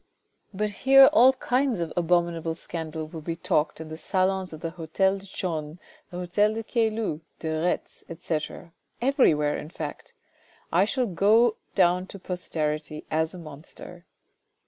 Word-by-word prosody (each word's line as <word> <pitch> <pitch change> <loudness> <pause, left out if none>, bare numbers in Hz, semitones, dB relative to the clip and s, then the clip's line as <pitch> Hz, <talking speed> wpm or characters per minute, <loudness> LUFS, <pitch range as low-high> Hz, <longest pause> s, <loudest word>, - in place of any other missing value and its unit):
But 210 +1 -2
here 270 +5 +7
all 255 +3 +7
kinds 255 -3 0
of 165 -2 -3
abominable 170 -1 +1
scandal 160 -1 -6
will 160 0 -8
be 165 +2 -4
talked 165 -4 0
in 160 -1 -8
the 160 - -7
salons 190 +1 0
of 155 -1 -9
the 165 - -3
hotel 185 +4 0
de 195 - -13
Chaulnes, 160 -4 -4 0.3
the 180 - -8
hotel 205 +4 +1
de 225 - -3
Caylus, 220 - -1 0.2
de 160 - -4
Retz, 180 - -2
etc., 165 0 -5 0.3
everywhere 235 - +3
in 150 - -6
fact. 155 -3 -7 0.6
I 180 +4 +4
shall 255 +3 0
go 215 +4 +3 0.2
down 180 -1 +3
to 200 - -9
posterity 155 -5 -4
as 160 +2 0
a - - -8
monster." 165 +2 -11
175 Hz, 150 wpm, -26 LUFS, 160-205 Hz, 0.6 s, here